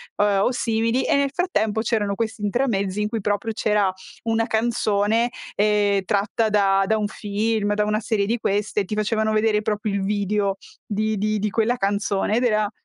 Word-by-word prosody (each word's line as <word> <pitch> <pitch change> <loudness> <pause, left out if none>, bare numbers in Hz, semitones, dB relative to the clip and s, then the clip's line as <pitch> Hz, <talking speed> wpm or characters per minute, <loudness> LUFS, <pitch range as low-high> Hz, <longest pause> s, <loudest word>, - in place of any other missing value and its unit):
o 205 - +2
ehm, 200 -1 +2
o - - +2
simili 230 +1 0
e - - +2
nel 280 -1 +2
frattempo 220 - 0
c'erano 210 -3 0
questi 220 -1 -3
intramezzi 205 -3 0
in 210 - -1
cui 225 -2 -3
proprio 210 +3 -1
c'era 210 -3 +1 0.3
una 225 0 0
canzone, 220 0 +1 0.3
ehm, 205 -1 +2
tratta 205 +2 0
da 210 0 +2 0.3
da 220 - +1
un 210 -1 -1
film, 210 0 -1
da 210 0 +1
una 210 0 0
serie 220 -3 0
di 235 +2 0
queste, 205 -1 -1
ti 210 - -6
facevano 215 +1 0
vedere 215 -1 +2
proprio 210 0 -1
il 200 -1 -1
video 200 0 0 0.3
di 215 0 -1
di 215 +1 0
di 210 +1 -1
quella 225 +3 +1
canzone 200 0 0
ed 250 - +1
era 215 -3 +1
215 Hz, 185 wpm, -22 LUFS, 205-225 Hz, 0.3 s, o